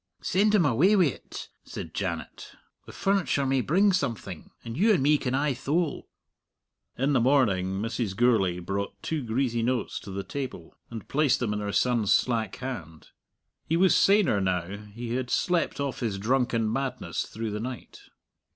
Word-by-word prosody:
"Send 210 +3 +3
him 185 -6 +4
away 150 - +4
wi't," 175 - -1
said - - -8
Janet. - - -5 0.3
"The - - -9
furniture 195 -8 +1
may 135 0 +2
bring 195 +9 +3
something. 115 - -3 0.2
And 115 0 -5
you 210 - +4
and 135 - 0
me 150 +1 +4
can 125 0 -1
aye 140 +1 +1
thole." 150 +6 -2 0.9
In 135 +3 +1
the 130 - +4
morning 100 -8 +2
Mrs. 115 -2 -2
Gourlay 105 -6 +3
brought 100 +3 -4
two 160 -2 -2
greasy 120 0 -1
notes 120 -1 -1
to - - -11
the 95 +1 -4
table, 130 -12 -6 0.2
and 115 -4 -8
placed 150 -2 +2
them 115 -4 -1
in 105 - -2
her 105 -1 -3
son's 120 -2 +2
slack 115 -5 +1
hand. 85 - -7 0.6
He 165 - +1
was 185 +1 +5
saner 195 - +4
now; 90 0 -1 0.2
he 115 +2 -5
had 125 0 -2
slept 175 +1 0
off 140 -2 -2
his 110 -5 -2
drunken 115 0 +1
madness 135 +1 -3
through 110 0 -5
the 105 - -3
night. 125 +2 -7
125 Hz, 170 wpm, -27 LUFS, 105-145 Hz, 0.9 s, was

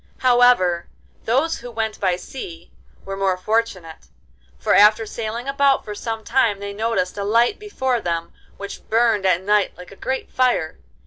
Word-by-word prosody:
However, 245 -9 +4 0.4
those 275 +8 +1
who 245 - -9
went 225 -2 -3
by 185 -3 +1
sea 175 -4 -9 0.3
were 195 - -5
more 195 -1 0
fortunate, 185 -5 -2 0.5
for 60 - +1
after 215 +2 +6
sailing 230 +3 -5
about 275 0 +2
for 210 - -5
some 225 +1 -5
time 230 -5 +1
they 200 0 -6
noticed 205 -3 -1
a - - -2
light 230 - +2
before 265 - -2
them 170 -2 -3 0.2
which 200 0 -9
burned 225 -3 +2
at 185 0 +2
night 205 0 +1
like 180 +1 -12
a - - -12
great 265 +6 -4
fire. 245 -11 0
215 Hz, 165 wpm, -21 LUFS, 190-240 Hz, 0.5 s, after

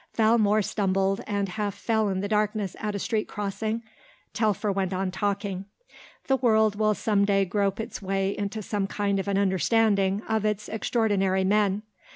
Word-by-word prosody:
Valmore 215 -2 +3
stumbled 195 -1 0
and 200 -1 -1
half 205 +1 -3
fell 220 0 0
in 190 -1 -1
the 200 - -2
darkness 210 -2 0
at 210 -1 -3
a - - 0
street 215 +1 -1
crossing. 215 +2 -3 0.5
Telfer 210 -1 +1
went 190 -1 -1
on 185 0 -1
talking. 200 -1 -2 0.6
"The 270 - +2
world 220 -4 +3
will 215 0 +2
some 205 -2 +1
day 195 -1 +3
grope 200 +1 0
its 220 - -5
way 195 0 -1
into 205 +1 -4
some 200 -1 -2
kind 200 -1 -1
of 195 - -4
an 200 -1 +1
understanding 200 0 +2
of 220 -1 0
its 210 -1 -1
extraordinary 205 -4 +1
men. 205 +1 +2
205 Hz, 170 wpm, -26 LUFS, 195-215 Hz, 0.6 s, Valmore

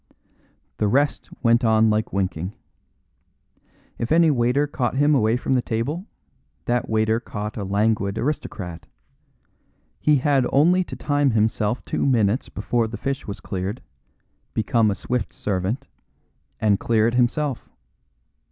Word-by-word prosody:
The 105 - +1
rest 140 +7 +1
went 115 0 +4
like 110 -2 +2
winking. 95 -1 -2 1.5
If 115 - -3
any 165 -1 +5
waiter 125 +2 +2
caught 130 -4 -2
him 145 +2 +3
away 115 -3 +3
from 125 - -1
the 125 - +3
table, 140 - -3 0.6
that 120 -1 0
waiter 110 +1 +2
caught 105 -2 -6
a 105 - -4
languid 100 0 0
aristocrat. 95 - -4 1.1
He 150 - +3
had 135 -2 +2
only 175 +6 +4
to - - -7
time 145 -1 +1
himself 110 0 0
two - - -2
minutes 115 -3 +2
before 115 +3 -1
the 110 +1 -6
fish 135 +4 -3
was 100 - -5
cleared, 95 +5 -4 0.8
become 110 0 +2
a 100 - 0
swift 125 +5 -3
servant, 105 +7 -2 0.7
and 105 -2 +2
clear 110 -2 +2
it 115 - 0
himself. 125 +2 0
115 Hz, 135 wpm, -23 LUFS, 105-135 Hz, 1.5 s, any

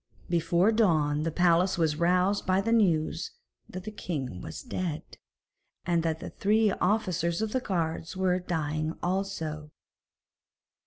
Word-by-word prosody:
Before 170 +4 +3
dawn 155 -10 +2
the 165 +1 -1
palace 175 +2 +3
was 160 -3 +1
roused 180 +4 +2
by 185 0 +3
the 220 +4 0
news 170 -8 +2 0.4
that 185 0 -7
the 215 - -6
king 135 - -5
was - - -7
dead, 185 - -3 0.8
and 170 -1 +2
that 160 -1 -1
the - - -7
three 215 +1 +2
officers 180 -4 0
of 220 -1 -1
the 260 - +1
guards 170 -5 -3
were 185 -1 +2
dying 155 -3 -2
also. 175 -5 -2
175 Hz, 140 wpm, -28 LUFS, 160-195 Hz, 0.8 s, Before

